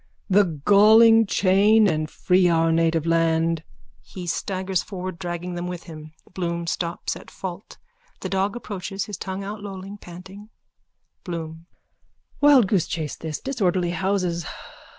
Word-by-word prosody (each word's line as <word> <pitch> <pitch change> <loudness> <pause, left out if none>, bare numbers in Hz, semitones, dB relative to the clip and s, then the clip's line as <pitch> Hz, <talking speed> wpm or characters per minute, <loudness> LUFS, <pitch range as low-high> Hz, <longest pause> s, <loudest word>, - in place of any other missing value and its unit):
_ - - -39 0.3
The 180 -7 +3
galling 220 +2 +7
chain. 205 +3 +4
And 155 -3 -1
free 180 +1 +2
our 165 -1 +2
native 165 -1 +1
land. 165 -1 +1 0.4
_(He 180 -2 -9
staggers 185 +2 -2
forward, 185 -3 -7
dragging 175 -1 -5
them 175 0 -4
with 180 -1 -6
him. 155 -2 -11 0.2
Bloom 170 -2 -3
stops, 170 0 -3
at - - -12
fault. 190 +1 -8 0.4
The - - -3
dog 195 +3 -1
approaches, 195 -4 -5
his 205 -3 -7
tongue 190 +1 -5
outlolling, 200 -1 -7
panting.)_ 190 +4 -12 0.7
BLOOM: 165 -2 -6 0.7
Wildgoose 245 - +5
chase 155 -3 -4
this. 160 -2 -5
Disorderly 185 -9 0
houses. 180 -3 -1
180 Hz, 130 wpm, -23 LUFS, 170-200 Hz, 0.7 s, galling